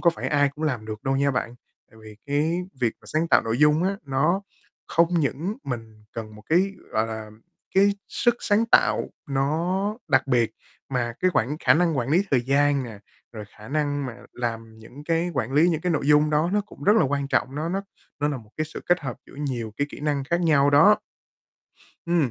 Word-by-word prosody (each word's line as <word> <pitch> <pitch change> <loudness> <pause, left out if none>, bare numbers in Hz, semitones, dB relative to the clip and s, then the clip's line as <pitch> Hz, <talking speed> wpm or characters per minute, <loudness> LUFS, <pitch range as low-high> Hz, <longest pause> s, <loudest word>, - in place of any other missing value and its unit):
có 170 - +5
phải - - -4
ai 145 -1 +3
cũng 155 +1 -4
làm 125 -8 -1
được 110 -1 -6
đâu 135 0 +1
nha 140 +1 +2
bạn, 125 -2 -2 0.4
tại 110 - -18
vì 110 -1 -12
cái 155 +5 0 0.2
việc 115 -3 +2
mà - - -24
sáng 160 +2 -1
tạo - - +5
nội 115 +1 -2
dung 150 +3 +4
á, 195 +1 0
nó 155 +7 +1 0.4
không 170 0 +3
những 155 +9 -2
mình 115 -4 -7
cần 110 -2 -7
một 105 - -13
cái, 185 +5 +2 0.2
gọi 110 +1 +1
là, 110 -1 -6 0.4
cái 200 +1 +5 0.2
sức 240 -1 +2
sáng 210 +2 +2
tạo - - +3 0.2
nó 140 +2 0 0.5
đặc 130 -2 +3
biệt 120 -4 +2 0.4
mà 120 -3 -1
cái 185 - +3
quản 140 +7 +1
khả - - +5
năng 165 -3 +2
quản 120 - -1
lý 175 +7 +3
thời 130 -3 +4
gian 140 +2 +2
nè, 110 -4 -9 0.3
rồi 110 -2 -7
khả 110 0 -12
năng 145 -1 -1
mà 120 - -7 0.2
làm 115 -2 -5
những 130 +6 -13
cái 165 +2 0
quản 130 0 -2
lý 155 +5 +5
những 160 -3 0
cái 180 0 0
nội 145 -2 -1
dung 150 0 +5
đó 155 +3 +2
nó 210 - +3
cũng - - -14
rất 210 +3 +5
là - - +5
quan 140 0 -1
trọng, 135 - 0
nó 155 +3 -2
nó 195 +3 -2 0.4
nó 145 - +2
là 145 - -2
một 110 -4 -13
cái 155 - 0
sự 155 - -8
kết 175 -1 +3
hợp 130 -5 -5
giữa - - -16
nhiều 125 -6 -4
cái 145 - 0
kỹ - - -10
năng 145 -2 -1
khác 170 +5 0
nhau 145 -4 +4
đó. 180 +9 +6 1.1
Ừm, 170 -6 +1
145 Hz, 225 wpm, -24 LUFS, 120-165 Hz, 1.1 s, đó